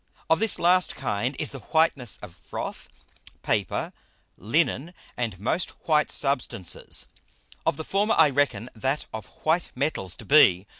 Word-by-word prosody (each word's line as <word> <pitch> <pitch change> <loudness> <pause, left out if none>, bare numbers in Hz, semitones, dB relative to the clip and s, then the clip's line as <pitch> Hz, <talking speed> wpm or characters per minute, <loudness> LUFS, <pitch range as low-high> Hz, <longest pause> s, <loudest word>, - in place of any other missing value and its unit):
Of 160 - +5
this 225 -1 +3
last 180 +1 +3
kind 120 +7 -2
is - - -1
the 135 - -6
Whiteness 145 - 0
of 95 -5 -10
Froth, - - -6 0.5
Paper, - - -1 0.4
Linnen, 150 - 0 0.2
and 115 -7 -3
most 155 - -1 0.2
white 155 -2 +3
Substances; 130 - -1 0.6
of - - +2
the 160 - -4
former 205 +3 +1
I 150 - +6
reckon 125 -5 0
that 135 +6 -1
of 110 -3 -6 0.2
white 160 +2 +1
Metals 125 - 0
to - - -12
be. 100 -11 +6
140 Hz, 145 wpm, -26 LUFS, 110-160 Hz, 0.6 s, I